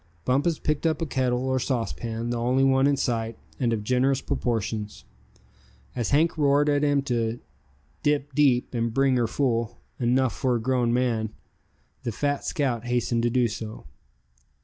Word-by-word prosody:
Bumpus 145 +5 +2
picked 150 +2 0
up 160 - 0
a 165 - -1
kettle 130 -3 0
or 130 0 +1
saucepan, 115 -2 -2
the 120 - -1
only 125 +3 +2
one 135 0 +4
in 140 -1 +2
sight, 115 -3 -1 0.2
and 120 -3 +1
of 110 -2 -1
generous 130 +3 +2
proportions. 110 - -3 0.9
As 120 - -1
Hank 155 +3 +2
roared 145 0 +3
at 145 -1 +2
him 145 -1 +2
to 120 -3 -1 0.6
"dip 145 -1 0
deep, 130 -4 +2
and 115 -1 0
bring 135 -1 +3
her 120 -2 +2
full, 115 -2 -1 0.2
enough 125 +1 +2
for 130 -3 +1
a - - 0
grown 120 0 +1
man," 120 -3 0 0.7
the 115 - -3
fat 145 +5 -1
scout 125 -8 -1
hastened 120 -1 0
to 120 - +2
do 125 0 +2
so. 110 -3 -7
125 Hz, 165 wpm, -25 LUFS, 115-140 Hz, 0.9 s, one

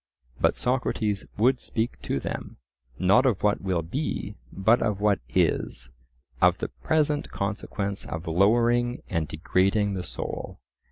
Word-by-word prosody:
But - - +3
Socrates 115 -5 0
would 125 +4 +3
speak 115 0 -2
to 70 - -1
them, - - -5 0.4
not 95 +8 +5
of 110 -7 0
what 105 0 +2
will 90 -3 0
be, 135 - -3 0.2
but 110 +6 +3
of 105 -3 0
what 105 -1 +3 0.2
is—of 60 0 0
the - - -4
present 150 - 0
consequence 100 0 -3
of 80 +1 -5
lowering 120 +8 +2
and 80 -2 0
degrading 95 +6 +1
the 95 - -2
soul. 90 - -6
100 Hz, 130 wpm, -26 LUFS, 85-120 Hz, 0.4 s, not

